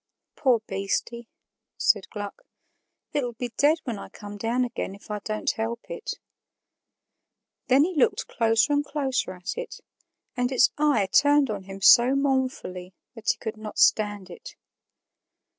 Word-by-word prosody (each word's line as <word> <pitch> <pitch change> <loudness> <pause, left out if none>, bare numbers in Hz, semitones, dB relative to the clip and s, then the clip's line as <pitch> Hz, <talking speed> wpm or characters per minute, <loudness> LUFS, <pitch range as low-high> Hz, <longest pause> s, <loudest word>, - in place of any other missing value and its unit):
"Poor 250 -6 +2
beastie," 200 +4 -3 0.5
said - - +2
Gluck, 205 -2 -7 0.7
"it'll 250 -5 -1
be 245 +2 -5
dead 295 +3 +4
when 230 -6 -4
I - - -9
come 205 -1 -10
down 230 +4 0
again, 215 -5 -5
if 200 - -13
I 210 - -2
don't 215 +1 -2
help 225 +1 -4
it." 475 -2 -5 1.5
Then 265 +2 +5
he 365 +4 -1
looked 280 - +2
closer 225 +4 +2
and 290 0 +2
closer 270 -8 -2
at 185 +4 -5
it, - - -7 0.6
and 250 0 0
its 255 -1 +4
eye 290 -10 +2
turned 285 -1 +4
on 200 -2 -5
him 195 0 -9
so 245 +6 +7
mournfully 260 -10 -2 0.2
that 225 -3 -4
he - - +2
could 220 -1 -5
not 215 -1 -8
stand 205 -3 +2
it. 175 - -11
235 Hz, 150 wpm, -25 LUFS, 205-270 Hz, 1.5 s, so